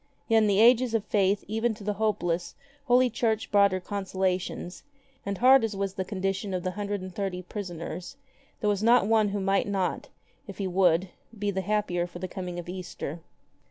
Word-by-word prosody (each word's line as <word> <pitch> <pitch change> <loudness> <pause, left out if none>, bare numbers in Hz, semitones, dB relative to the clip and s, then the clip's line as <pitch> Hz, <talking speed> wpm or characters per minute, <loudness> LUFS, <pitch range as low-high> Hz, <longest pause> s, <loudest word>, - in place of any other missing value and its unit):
Yet 225 -1 +5
in 215 - +3
the 200 -1 +3
ages 240 +1 +5
of 215 -2 -1
Eaith 200 -1 +2
even 225 +2 0
to 210 - -12
the 210 +1 -1
hopeless 175 -5 -1 0.3
Holy 250 0 +5
Church 225 -2 -1
brought 200 -1 +5
her 185 - -1
consolations, 190 -2 -3 0.5
and 200 -1 -2
hard 260 +2 +6
as 220 -2 -1
was 195 -1 -2
the 190 - -2
condition 195 0 -2
of 180 - -3
the 185 - -1
hundred 205 0 -3
and 185 -1 -8
thirty 185 -2 -3
prisoners, 180 +2 -6 0.4
there 210 - +2
was 200 -1 -1
not 235 -1 +5
one 215 -1 +3
who 200 +1 -2
might 195 +1 +1
not, 195 -2 -2 0.4
if 195 - -9
he 200 - -2
would, 180 -1 +2 0.3
be 205 0 -1
the 190 -1 -2
happier 190 -3 0
for 175 - -10
the 185 +1 -4
coming 180 -1 -6
of 175 - -6
Easter. 175 -3 -6
195 Hz, 195 wpm, -27 LUFS, 185-215 Hz, 0.5 s, hard